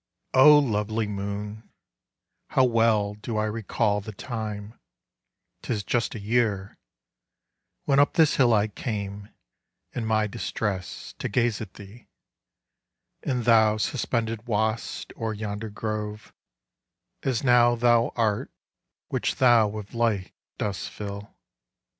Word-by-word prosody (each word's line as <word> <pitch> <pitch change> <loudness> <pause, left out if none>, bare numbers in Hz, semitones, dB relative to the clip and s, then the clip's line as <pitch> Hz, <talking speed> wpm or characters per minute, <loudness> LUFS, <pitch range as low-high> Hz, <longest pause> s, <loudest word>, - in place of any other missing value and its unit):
O 150 +3 +8
lovely 110 -4 0
moon, 105 +1 -5 0.8
how 130 - +3
well 115 -4 +3
do 105 +2 -5
I 105 - +1
recall 110 -1 0
The 110 - -7
time,—'tis 110 -1 -7
just 120 +4 -1
a - - -5
year—when 110 +5 -3
up 145 - +4
this 160 -2 +4
hill 125 -3 +5
I 105 -1 +3
came, 100 -2 -5 0.6
in 115 -3 -3
my 110 -1 +2
distress, 105 -3 -4
to - - -2
gaze 115 -1 +1
at 95 - -8
thee: 105 +4 -13 1.1
And 125 -4 -2
thou 110 -2 +5
suspended 115 -1 -2
wast 110 -2 -2
o'er 110 -1 -2
yonder 105 +1 -4
grove, 105 0 -5 0.9
As 130 -3 -1
now 120 -2 +5
thou 120 0 +3
art, 110 -3 0 0.6
which - - -1
thou 120 -4 +5
with 105 -1 -7
light 115 -5 0 0.2
dost 100 -3 -3
fill. 100 0 -7
110 Hz, 115 wpm, -26 LUFS, 105-120 Hz, 1.1 s, O